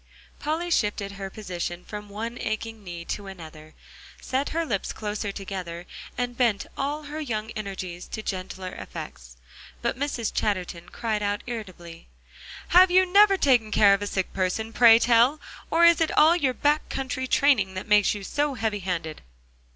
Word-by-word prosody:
Polly 325 +4 -2
shifted 205 -7 0
her 195 -1 -6
position 180 -3 -5
from 210 -1 -8
one 225 +4 -5
aching 220 0 -4
knee 170 -2 -7
to 200 +2 -5
another, 155 -4 -11 0.4
set 265 +2 -2
her 330 +1 -1
lips 205 -10 -2
closer 210 -1 -4
together, 185 -3 -6 0.3
and 245 -1 -2
bent 235 -5 +1
all 290 +3 -2
her 300 +1 -6
young 220 -7 -3
energies 190 -4 -6
to 220 - -6
gentler 185 -1 -5
effects. 60 -1 -9 0.5
But - - -1
Mrs. 275 -5 -2
Chatterton 180 -4 -2
cried 220 -3 -2
out 205 0 -1
irritably: 185 -8 -8 0.6
"Have 365 +2 +7
you 370 +1 +5
never 395 +2 +5
taken 245 -9 +3
care 205 -1 +5
of 200 - 0
a 205 - -2
sick 190 -2 -2
person, 195 +4 -2
pray 230 -2 +8
tell, 240 +5 +4 0.3
or 340 +1 +5
is 340 0 +6
it 320 - +3
all 315 +3 +7
your 275 -7 0
back 295 +1 +1
country 260 -1 -3
training 235 -10 +3
that 185 - -5
makes 210 -1 +4
you 205 - -7
so 290 +7 -1
heavy 220 -3 -1
handed?" 170 -4 -4
215 Hz, 165 wpm, -25 LUFS, 190-270 Hz, 0.6 s, pray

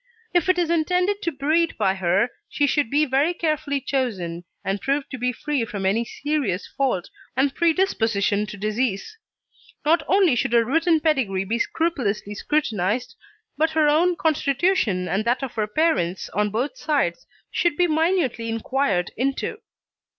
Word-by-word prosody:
If 350 0 +2
it 370 - +4
is 340 -2 +1
intended 360 +5 +1
to 335 - -1
breed 310 +4 +1
by 195 -3 +2
her, 190 +4 +1 0.2
she 290 - +1
should 285 -2 +1
be 295 +3 +3
very 285 +6 +1
carefully 305 -4 -1
chosen 200 -11 -2 0.2
and 195 +1 -1
proved 275 +1 -1
to 260 - -5
be 250 +1 +1
free 280 +1 -2
from 200 -3 -4
any 210 +5 +2
serious 275 -10 -2
fault 255 -11 -2 0.3
or 270 +2 +4
predisposition 225 - +1
to 210 - -8
disease. 215 - -2 0.7
Not 325 +3 +4
only 380 -6 +4
should 240 -1 0
her 235 -1 +4
written 325 +5 +2
pedigree 245 - +1
be 230 +4 -1
scrupulously 230 -11 -1
scrutinised, 225 -4 -1 0.5
but 320 +1 +3
her 310 -1 +5
own 340 +4 +3
constitution 285 - +1
and 195 +3 0
that 245 +3 +1
of 265 - -4
her 215 -2 -1
parents 210 - 0
on 210 +3 0
both 240 +7 -2
sides 275 - -1 0.2
should 345 -4 +1
be 355 - +4
minutely 315 -8 +1
inquired 225 -5 0
into. 270 +3 -2
270 Hz, 160 wpm, -23 LUFS, 210-315 Hz, 0.7 s, her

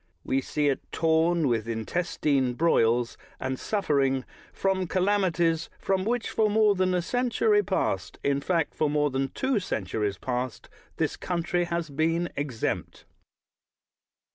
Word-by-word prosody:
We 135 - 0
see 150 +2 0
it 140 - +1
torn 165 0 +2
with 115 -3 0
intestine 130 +2 0
broils, 120 -6 +2 0.2
and 130 0 -3
suffering 140 -10 +1 0.3
from 190 -1 0
calamities 175 -4 +1
from 190 -1 0
which 240 0 -1
for 215 -1 +2
more 210 0 +4
than 185 -1 +1
a 175 - 0
century 230 -1 +2
past 95 - -1
— - - -37
in 140 0 +1
fact, 165 0 0
for 155 - +1
more 150 -1 +1
than 135 +1 0
tsvo 260 - 0
centuries 105 - -2
past 125 -2 -4
— - - -32
this - - 0
country 175 0 -1
has 170 -2 -3
been 165 +4 0
exempt. 135 -5 -3
165 Hz, 140 wpm, -27 LUFS, 135-185 Hz, 0.3 s, more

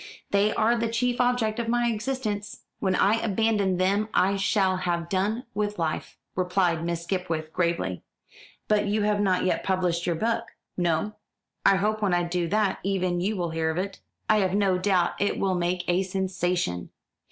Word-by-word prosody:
"They 200 +1 +3
are 225 +2 +3
the 230 0 0
chief 245 +2 0
object 245 -3 +1
of 235 - -2
my 240 +1 +2
existence. 215 -2 -3 0.2
When 190 -2 +1
I 220 +5 +3
abandon 205 -3 +1
them 200 +4 +1
I 195 +2 +3
shall 195 -1 +2
have 170 -2 -2
done 205 +6 0
with 210 0 -2
life," 160 -2 -3 0.2
replied 180 -2 +1
Miss 170 0 -2
Skipwith 170 -3 -3
gravely. 170 - -1 0.7
"But 210 -1 +2
you 210 +1 +1
have 210 0 +1
not 185 -3 +2
yet 185 - 0
published 180 -2 0
your 170 - +1
book." 230 +5 0 0.3
"No; 175 +4 0 0.5
I 195 - +6
hope 215 +3 0
when 195 -4 +2
I 175 - +1
do 175 0 -1
that 210 +2 +1
even 185 -2 0
you 205 +4 0
will 175 -2 -2
hear 160 0 0
of 160 - -2
it." 195 +1 -3 0.3
"I 215 - +4
have 190 -2 +1
no 195 -3 +2
doubt 185 -2 +1
it 205 - +1
will 195 -1 +1
make 175 0 0
a 175 +1 +2
sensation." 180 - -1
190 Hz, 180 wpm, -26 LUFS, 175-210 Hz, 0.7 s, I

